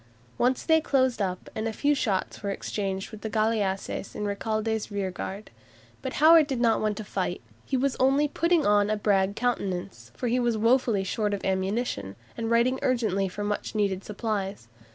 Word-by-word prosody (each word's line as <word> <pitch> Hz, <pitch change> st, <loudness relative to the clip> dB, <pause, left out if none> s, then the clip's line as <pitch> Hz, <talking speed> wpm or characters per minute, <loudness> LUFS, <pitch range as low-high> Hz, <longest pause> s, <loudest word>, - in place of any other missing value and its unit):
Once 250 Hz, +1 st, +2 dB
they 320 Hz, -1 st, +4 dB
closed 260 Hz, -6 st, +1 dB
up, 185 Hz, -2 st, -2 dB
and 220 Hz, +1 st, -2 dB
a -, -, -1 dB
few 285 Hz, +7 st, +1 dB
shots 210 Hz, -9 st, -1 dB
were 200 Hz, -, -3 dB
exchanged 195 Hz, 0 st, -3 dB
with 215 Hz, -1 st, -10 dB
the 220 Hz, -, -4 dB
galleasses 210 Hz, -3 st, -1 dB
in 210 Hz, -, -3 dB
Recalde's 215 Hz, +1 st, -2 dB
rearguard. 195 Hz, 0 st, -4 dB, 0.5 s
But 260 Hz, -, -4 dB
Howard 315 Hz, 0 st, +6 dB
did 265 Hz, -4 st, -2 dB
not 230 Hz, -2 st, +3 dB
want 210 Hz, -1 st, 0 dB
to 215 Hz, -, -4 dB
fight. 205 Hz, -, -2 dB, 0.3 s
He 265 Hz, -, 0 dB
was 270 Hz, +1 st, +1 dB
only 275 Hz, +3 st, +4 dB
"putting 335 Hz, +2 st, +2 dB
on 205 Hz, 0 st, +4 dB
a 215 Hz, -, +1 dB
brag 200 Hz, -1 st, +2 dB
countenance," 200 Hz, -7 st, -2 dB
for 250 Hz, -, -3 dB
he 245 Hz, +2 st, +2 dB
was 240 Hz, -2 st, +1 dB
woefully 230 Hz, -2 st, +3 dB
short 205 Hz, +1 st, -1 dB
of 200 Hz, -, -7 dB
ammunition, 190 Hz, -, -1 dB, 0.2 s
and 225 Hz, -1 st, -3 dB
writing 240 Hz, +3 st, +3 dB
urgently 215 Hz, -6 st, +1 dB
for 205 Hz, +3 st, -5 dB
much 205 Hz, +1 st, -3 dB
needed 200 Hz, -2 st, 0 dB
supplies. 205 Hz, -, -3 dB
215 Hz, 180 wpm, -27 LUFS, 200-245 Hz, 0.5 s, Howard